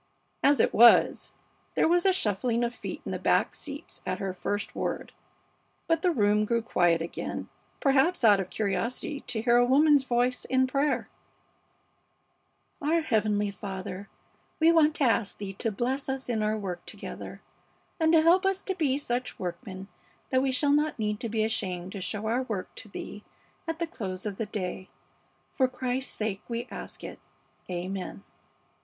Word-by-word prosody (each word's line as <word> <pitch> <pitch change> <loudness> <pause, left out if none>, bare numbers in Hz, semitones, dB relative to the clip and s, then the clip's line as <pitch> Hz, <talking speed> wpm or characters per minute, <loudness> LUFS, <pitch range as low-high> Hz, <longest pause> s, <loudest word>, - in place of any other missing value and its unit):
As 285 +1 +4
it - - +3
was, 235 +1 +6 0.4
there - - +4
was 350 +3 +3
a - - +6
shuffling 230 - 0
of 240 0 -1
feet - - -7
in - - -4
the - - -3
back - - +2
seats - - -7
at - - -2
her 195 -1 -3
first 205 +2 -3
word; - - -3 0.7
but 330 -1 +1
the 365 - +3
room, 210 -8 +3
grew 230 +1 0
quiet 175 -7 +2
again, 170 - -5 0.3
perhaps 280 +4 +3
out 205 -3 +7
of 185 -1 -3
curiosity 220 +8 -2
to 225 -3 -2
hear 240 0 +5
a 245 - +6
woman's 285 +3 +5
voice 250 0 +1
in 260 0 +3
prayer: 275 +3 0 1.7
"Our 320 +3 +2
Heavenly 210 -7 +1
Father, 195 0 -6 0.5
we 325 +1 +6
want 310 -2 +4
to - - 0
ask 230 -4 +1
Thee 200 -1 -5
to 225 - 0
bless 255 +6 -2
us 265 -1 -3
in 225 -3 0
our 215 +1 +1
work 190 -4 -5
together, - - -8 0.6
and 320 -1 +4
to 320 -1 +6
help 350 +4 +5
us 385 0 0
to 380 - -1
be 290 -7 +1
such 250 -3 -3
workmen 185 +2 -6 0.4
that 260 -1 +3
we 265 0 +1
shall 280 +3 +2
not 300 +1 +1
need 210 -2 -1
to 230 - -3
be 220 0 0
ashamed 185 -4 -2
to 195 - -6
show 205 +3 -3
our 235 +4 +1
work 215 -8 -4
to 220 - -8
Thee 205 +1 -8 0.4
at 325 0 -2
the 340 - -1
close 195 - -6
of 205 -2 -3
the 225 - -3
day. 185 -2 -4 0.6
For 260 - +3
Christ's 255 +1 -2
sake 210 -2 -2
we 235 +1 -3
ask - - -8
it. - - -7 0.5
Amen." 185 +2 -4
235 Hz, 175 wpm, -28 LUFS, 205-275 Hz, 1.7 s, out